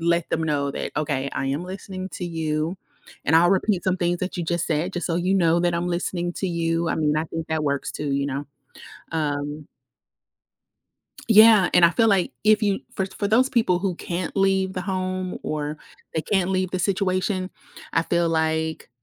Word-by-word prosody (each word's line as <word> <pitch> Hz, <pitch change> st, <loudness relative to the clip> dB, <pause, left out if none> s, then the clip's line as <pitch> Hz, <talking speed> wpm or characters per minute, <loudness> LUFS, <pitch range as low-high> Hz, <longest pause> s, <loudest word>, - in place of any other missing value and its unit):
let 170 Hz, 0 st, +1 dB
them 160 Hz, -, 0 dB
know 145 Hz, -3 st, 0 dB
that, -, -, -4 dB
"Okay, 145 Hz, -2 st, -1 dB
I -, -, -2 dB
am 140 Hz, +5 st, -1 dB
listening 185 Hz, 0 st, -6 dB
to 180 Hz, -, -4 dB
you, 160 Hz, 0 st, -2 dB, 0.5 s
and 160 Hz, -, +4 dB
I'll 175 Hz, +2 st, +5 dB
repeat 195 Hz, -1 st, +1 dB
some 185 Hz, 0 st, +1 dB
things 175 Hz, 0 st, 0 dB
that 185 Hz, 0 st, -3 dB
you 175 Hz, -, -2 dB
just 170 Hz, 0 st, -1 dB
said, 165 Hz, +4 st, -1 dB
just 175 Hz, -, -2 dB
so 170 Hz, -1 st, 0 dB
you 180 Hz, +2 st, +1 dB
know 170 Hz, -2 st, +3 dB
that 175 Hz, -1 st, +1 dB
I'm 170 Hz, +1 st, -1 dB
listening 175 Hz, 0 st, -2 dB
to 190 Hz, -, -2 dB
you." 165 Hz, -1 st, 0 dB
I -, -, 0 dB
mean, 150 Hz, -1 st, +1 dB
I 155 Hz, -, 0 dB
think 165 Hz, 0 st, -6 dB
that 160 Hz, -1 st, -1 dB
works 140 Hz, -1 st, -1 dB
too, 145 Hz, -1 st, -3 dB
you 140 Hz, 0 st, 0 dB
know? 140 Hz, +1 st, -4 dB, 0.7 s
Um 145 Hz, -1 st, -2 dB, 1.6 s
Yeah, 215 Hz, -3 st, +7 dB
and 175 Hz, -1 st, +8 dB
I 170 Hz, -, +4 dB
feel, 225 Hz, +6 st, +3 dB
like, 195 Hz, -4 st, +2 dB
if 215 Hz, +1 st, +4 dB
you 200 Hz, -1 st, +1 dB, 0.2 s
for 190 Hz, -, 0 dB
for 200 Hz, +1 st, -4 dB
those 250 Hz, +5 st, +3 dB
people 220 Hz, -7 st, +2 dB
who 190 Hz, 0 st, -1 dB
can't 175 Hz, +2 st, -4 dB
leave 195 Hz, -1 st, +2 dB
the 185 Hz, -, -3 dB
home 185 Hz, -1 st, -3 dB
or 150 Hz, 0 st, -3 dB, 0.4 s
they 160 Hz, -, +1 dB
can't 190 Hz, -3 st, +1 dB
leave 185 Hz, -1 st, 0 dB
the 185 Hz, -, -2 dB
situation, 185 Hz, 0 st, 0 dB, 0.4 s
I -, -, +3 dB
feel, 170 Hz, 0 st, +1 dB
like, 160 Hz, -2 st, -1 dB
175 Hz, 200 wpm, -24 LUFS, 160-190 Hz, 1.6 s, and